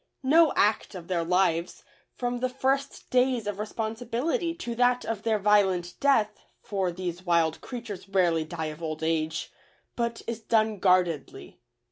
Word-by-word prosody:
No 315 +4 +5
act 210 -1 +2
of 175 -1 -9
their 175 -2 0
lives, 175 -1 +1 0.3
from 245 0 -2
the 255 +1 0
first 270 +2 -2
days 250 -2 +2
of 205 -1 -4
responsibility 240 - -2
to 240 -9 -5
that 245 +1 +2
of 225 -2 -3
their 220 -1 +1
violent 190 -4 +2
death 220 -7 +2 0.2
(for 190 -3 -1
these 175 0 -5
wild 170 -3 +1
creatures 230 -6 -7
rarely 175 -4 +2
die 160 -1 -4
of 150 - -15
old 155 -1 -4
age) 160 -1 -1 0.4
but 235 -1 -2
is 230 -1 -4
done 220 -2 +1
guardedly. 180 -6 0
210 Hz, 150 wpm, -27 LUFS, 175-245 Hz, 0.4 s, No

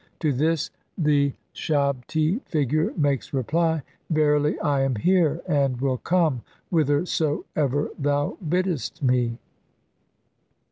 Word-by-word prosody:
To 150 -3 +2
this 155 +4 0 0.3
the 145 -4 +2 0.2
shabti 155 - 0
figure 155 - 0
makes 140 -3 0
reply, 160 +4 +1 0.3
"Verily 150 -1 +2
I 140 -2 +1
am 135 -2 +1
here, 170 - +2
"[and 140 -6 +1
will 130 -1 0
come] 165 -8 +1 0.3
whithersoever 145 -2 0
thou 145 0 0
biddest 175 - -1
me." 125 -2 +2
145 Hz, 100 wpm, -24 LUFS, 135-160 Hz, 0.3 s, To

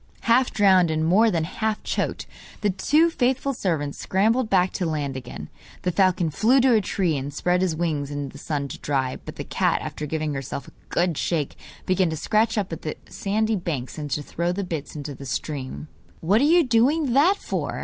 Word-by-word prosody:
Half 250 +2 +3
drowned, 190 -4 +4
and 155 0 0
more 210 +7 +5
than 165 -5 0
half 220 +5 -2
choked, - - -2 0.4
the 205 -2 +2
two 300 - +3
faithful 265 0 0
servants 160 - -2
scrambled 220 +5 +1
back 185 -2 +3
to 180 - -2
land 145 -4 -2
again. 130 - -7 0.4
The 180 - +1
falcon 180 -3 +2
flew 235 - +4
to 255 -1 +4
a 220 - +4
tree 180 -4 0
and 140 +1 -3
spread 180 +5 +1
his 180 -4 +1
wings 155 -4 -1
in 145 -1 -4
the 140 - -12
sun 145 -2 -3
to - - -7
dry, 135 -3 -1
but - - -8
the - - -5
cat, - - +1
after 150 - -5
giving 155 0 -2
herself 135 0 -5
a - - -13 0.2
good 175 -3 0
shake, 155 -5 -1 0.3
began 185 -1 +2
to 160 - -3
scratch 220 +7 +1
up 200 -3 0
the 160 -2 -5
sandy 220 +2 0
banks 155 -7 -4
and 150 -1 -5
to 145 +1 -2
throw 170 +4 -2
the 200 +3 -2
bits 160 -6 -5
into 145 -1 -5
the 135 +1 -9
stream. 140 +1 -4 0.3
'What 200 +8 +3
are - - +4
you 340 +3 +5
doing 260 +3 +2
that 335 +9 +5
for? - - -3
180 Hz, 205 wpm, -24 LUFS, 150-220 Hz, 0.4 s, more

